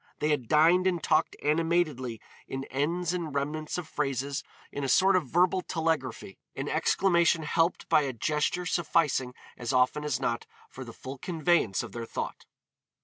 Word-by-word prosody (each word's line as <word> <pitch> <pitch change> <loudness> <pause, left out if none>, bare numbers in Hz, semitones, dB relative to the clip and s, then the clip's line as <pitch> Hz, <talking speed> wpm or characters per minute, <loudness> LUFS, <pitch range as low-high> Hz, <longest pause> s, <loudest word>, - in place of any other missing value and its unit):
They 150 - 0
had 140 -6 0
dined 170 +6 +4
and 175 -3 0
talked - - +2
animatedly 150 -6 0 0.3
in 135 0 -4
ends 170 +6 0
and 165 -5 -4
remnants 150 +3 -2
of 175 -3 -5
phrases 140 -1 -2 0.3
in 140 - -4
a 135 - -1
sort 190 +8 +5
of 175 -7 +1
verbal 180 +5 +2
telegraphy; 160 - -2 0.2
an - - -4
exclamation 170 -3 +2
helped 165 +3 0
by - - +4
a 140 -2 -2
gesture 150 +8 -1
sufficing 150 -7 +1 0.2
as 120 0 -3
often 130 +4 +2
as 145 -4 -1
not 120 -3 -2 0.2
for 130 - -8
the 120 - -9
full 130 +4 -9
conveyance 165 - +1
of - - -8
their 115 -1 -6
thought. - - -5
150 Hz, 165 wpm, -28 LUFS, 130-170 Hz, 0.3 s, sort